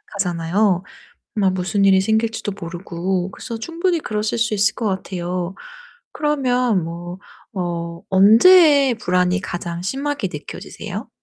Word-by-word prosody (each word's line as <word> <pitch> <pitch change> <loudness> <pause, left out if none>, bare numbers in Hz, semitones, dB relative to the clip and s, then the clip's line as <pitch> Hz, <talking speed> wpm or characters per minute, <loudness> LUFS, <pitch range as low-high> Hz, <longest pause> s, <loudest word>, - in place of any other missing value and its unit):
하잖아요 180 +1 +1 0.5
뭐 195 -3 +3
무슨 185 +2 0
일이 190 -1 +5
생길지도 220 +1 0
모르고. 175 +2 -3
그래서 230 +4 -7
충분히 335 +6 -1
그러실 215 -2 -2
수 230 0 +1
있을 205 +1 +2
것 230 - -3
같아요. 180 -2 -3 0.6
그러면 250 - +1
뭐 175 +2 -7 0.4
어 170 -2 -4
언제 275 - +6
불안이 180 +1 +1
가장 175 -1 -5
심하게 270 +1 -2
느껴지세요? 150 - -7
195 Hz, 280 characters per minute, -20 LUFS, 180-230 Hz, 0.6 s, 언제